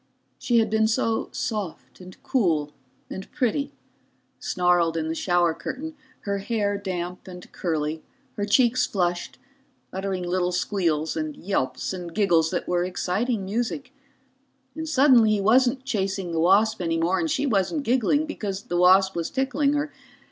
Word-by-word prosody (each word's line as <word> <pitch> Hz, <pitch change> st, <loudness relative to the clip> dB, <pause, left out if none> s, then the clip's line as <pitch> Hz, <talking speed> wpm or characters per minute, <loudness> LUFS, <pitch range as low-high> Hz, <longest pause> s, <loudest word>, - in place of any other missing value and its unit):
She 240 Hz, -, +1 dB
had 225 Hz, -2 st, +2 dB
been 220 Hz, 0 st, +3 dB
so 225 Hz, 0 st, 0 dB
soft 190 Hz, -, -5 dB
and 185 Hz, 0 st, -12 dB
cool 160 Hz, -, +1 dB, 0.4 s
and 190 Hz, -, -8 dB
pretty, 280 Hz, +2 st, -1 dB, 0.7 s
snarled 175 Hz, -2 st, +1 dB
in 160 Hz, 0 st, -2 dB
the -, -, -1 dB
shower 175 Hz, 0 st, +2 dB
curtain, 310 Hz, -, -6 dB, 0.3 s
her 200 Hz, -1 st, -2 dB
hair 205 Hz, -1 st, -1 dB
damp 180 Hz, -2 st, -5 dB
and 180 Hz, -1 st, -11 dB
curly, 155 Hz, -2 st, -2 dB, 0.3 s
her 205 Hz, -, -3 dB
cheeks 240 Hz, +3 st, +3 dB
flushed, 175 Hz, -3 st, -2 dB, 0.6 s
uttering 190 Hz, -1 st, -3 dB
little 180 Hz, 0 st, 0 dB
squeals 170 Hz, -4 st, 0 dB
and 155 Hz, -2 st, -3 dB
yelps 130 Hz, -7 st, -2 dB
and 175 Hz, -2 st, -7 dB
giggles 170 Hz, -6 st, +3 dB
that 175 Hz, -, -3 dB
were 175 Hz, 0 st, +1 dB
exciting 195 Hz, +4 st, -1 dB
music, 240 Hz, +6 st, -3 dB, 0.8 s
and 320 Hz, +1 st, -5 dB
suddenly 260 Hz, -6 st, +5 dB
he 210 Hz, -, +1 dB
wasn't 255 Hz, +5 st, +3 dB
chasing 195 Hz, -6 st, -2 dB
the 165 Hz, -, -1 dB
wasp 200 Hz, +5 st, +3 dB
any 165 Hz, -1 st, 0 dB
more 170 Hz, +3 st, +1 dB
and 325 Hz, -, -1 dB
she 300 Hz, -1 st, 0 dB
wasn't 235 Hz, -, 0 dB
giggling 260 Hz, +4 st, +2 dB
because 205 Hz, -10 st, -5 dB
the 175 Hz, -, -3 dB
wasp 190 Hz, +2 st, +5 dB
was 170 Hz, -1 st, -2 dB
tickling 280 Hz, +2 st, +1 dB
her. 295 Hz, 0 st, -1 dB
195 Hz, 155 wpm, -25 LUFS, 175-235 Hz, 0.8 s, suddenly